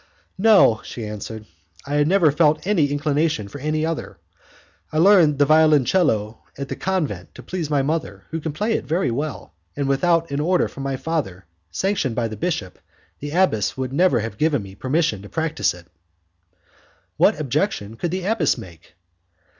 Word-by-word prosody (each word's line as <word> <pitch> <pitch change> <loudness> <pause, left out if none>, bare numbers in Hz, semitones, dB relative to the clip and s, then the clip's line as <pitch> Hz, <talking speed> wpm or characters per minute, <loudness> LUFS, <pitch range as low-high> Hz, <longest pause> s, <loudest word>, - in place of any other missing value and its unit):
"No," 195 - +5
she 115 - -7
answered, 105 +1 -7 0.4
"I 145 +1 +1
never 170 -2 +4
felt 155 +1 +2
any 180 -7 +2
inclination 145 -5 0
for 125 +8 -9
any 155 +1 0
other. 160 - -4 0.7
I 155 - -3
learned 170 -4 +5
the 145 - +4
violoncello 150 - +3 0.2
at 140 0 -5
the - - -3
convent 155 - -3
to - - -11
please 175 -5 -4
my 145 -2 +1
mother, 155 +3 -3
who 160 0 -3
can 160 - -3
play 210 +9 -1
it - - -2
pretty 165 -3 0
well, 140 - -4 0.2
and 140 -1 -2
without 165 +4 +1
an 140 - -1
order 175 +4 +2
from 140 - -10
my 135 -1 -2
father, 130 - -3 0.2
sanctioned 170 - -1
by 120 -2 0
the 110 - -6
bishop, 105 - -3 0.4
the 145 - -5
abbess 150 - +1
would 130 0 -3
never 155 -6 +3
have 105 -2 -6
given 150 -8 +1
me 95 -1 -11
permission 130 - -1
to 100 - -11
practise 160 -1 0
it." 90 -1 -14 1.3
"What - - +3
objection 140 - -2
could 170 +9 -3
the 180 +1 -3
abbess 205 -8 +1
make?" 85 -1 -13
150 Hz, 170 wpm, -22 LUFS, 115-165 Hz, 1.3 s, No